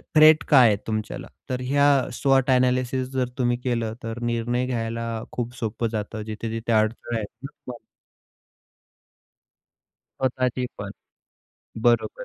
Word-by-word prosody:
Threat 155 Hz, +1 st, +7 dB
काय 130 Hz, -5 st, +8 dB
आहे 105 Hz, -, +3 dB
तुमच्याला? 110 Hz, -1 st, -3 dB, 0.2 s
तर 125 Hz, -1 st, -2 dB
ह्या 140 Hz, +2 st, +3 dB, 0.3 s
स्वॉट 135 Hz, +1 st, +2 dB
अ‍ॅनालिसिस 130 Hz, 0 st, +2 dB
जर 130 Hz, -2 st, 0 dB
तुम्ही 120 Hz, -1 st, +1 dB
केलं, 115 Hz, -3 st, -1 dB
तर 115 Hz, +1 st, -5 dB
निर्णय 120 Hz, +1 st, 0 dB
घ्यायला 115 Hz, -1 st, -3 dB
खूप 120 Hz, 0 st, -4 dB
सोपं 115 Hz, +1 st, -2 dB
जातं. 110 Hz, 0 st, -4 dB
जिथे-जिथे 115 Hz, +1 st, -4 dB
अडथळे 110 Hz, +2 st, 0 dB
आहेत 105 Hz, -, -3 dB, 0.2 s
ना -, -, -3 dB
तुम्हाला 125 Hz, -1 st, -10 dB, 2.4 s
स्वतःची 130 Hz, -1 st, 0 dB
पण. -, -, -6 dB, 0.9 s
बरोबर. 120 Hz, -, +2 dB
120 Hz, 125 wpm, -24 LUFS, 115-130 Hz, 2.4 s, काय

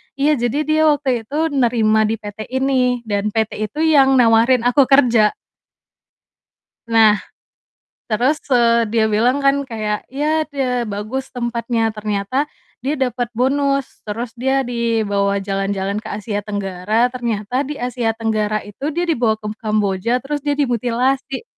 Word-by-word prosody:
Iya, 285 Hz, -1 st, +2 dB
jadi 265 Hz, +5 st, -3 dB
dia 310 Hz, +1 st, +1 dB
waktu 265 Hz, -6 st, 0 dB
itu 310 Hz, +4 st, -1 dB
nerima 225 Hz, -5 st, +2 dB
di 225 Hz, -, 0 dB
PT 210 Hz, 0 st, -8 dB
ini 255 Hz, -2 st, 0 dB
dan 210 Hz, 0 st, -2 dB
PT 220 Hz, -1 st, +1 dB, 0.2 s
itu 215 Hz, -, -9 dB
yang 275 Hz, -4 st, +5 dB
nawarin 235 Hz, 0 st, +4 dB
aku 250 Hz, +2 st, +4 dB
kerja. 240 Hz, -6 st, +4 dB, 1.5 s
Nah, 220 Hz, -2 st, +5 dB, 0.9 s
terus, 250 Hz, +8 st, +2 dB, 0.2 s
eee, 235 Hz, -1 st, +4 dB
dia 220 Hz, -1 st, +2 dB
bilang 235 Hz, +6 st, +2 dB
kan 275 Hz, 0 st, +2 dB
kayak, 215 Hz, -5 st, -3 dB
"Ya, 305 Hz, +3 st, 0 dB
itu 300 Hz, -2 st, -19 dB
ya 260 Hz, -2 st, +1 dB
bagus 215 Hz, +5 st, -5 dB
tempatnya," 235 Hz, -2 st, -1 dB
ternyata 210 Hz, +7 st, -2 dB, 0.3 s
dia 280 Hz, +2 st, -2 dB
dapat 245 Hz, -2 st, -1 dB
bonus, 275 Hz, +3 st, +1 dB, 0.2 s
terus 225 Hz, +3 st, -5 dB
dia 265 Hz, +3 st, +1 dB
dibawa 215 Hz, -4 st, 0 dB
jalan-jalan 195 Hz, 0 st, -1 dB
ke -, -, -8 dB
Asia 205 Hz, 0 st, -3 dB
Tenggara, 205 Hz, +2 st, 0 dB
ternyata 240 Hz, 0 st, -2 dB
di 290 Hz, +1 st, -6 dB
Asia 245 Hz, -2 st, -1 dB
Tenggara 215 Hz, -2 st, -1 dB
itu 205 Hz, +6 st, -12 dB
dia 345 Hz, -, 0 dB
dibawa 240 Hz, -9 st, +1 dB
ke 210 Hz, -, -7 dB
Kamboja 215 Hz, +1 st, 0 dB
terus 295 Hz, +2 st, -3 dB
dia 290 Hz, -1 st, 0 dB
dimutilasi 255 Hz, -, -1 dB
235 Hz, 140 wpm, -19 LUFS, 215-270 Hz, 1.5 s, yang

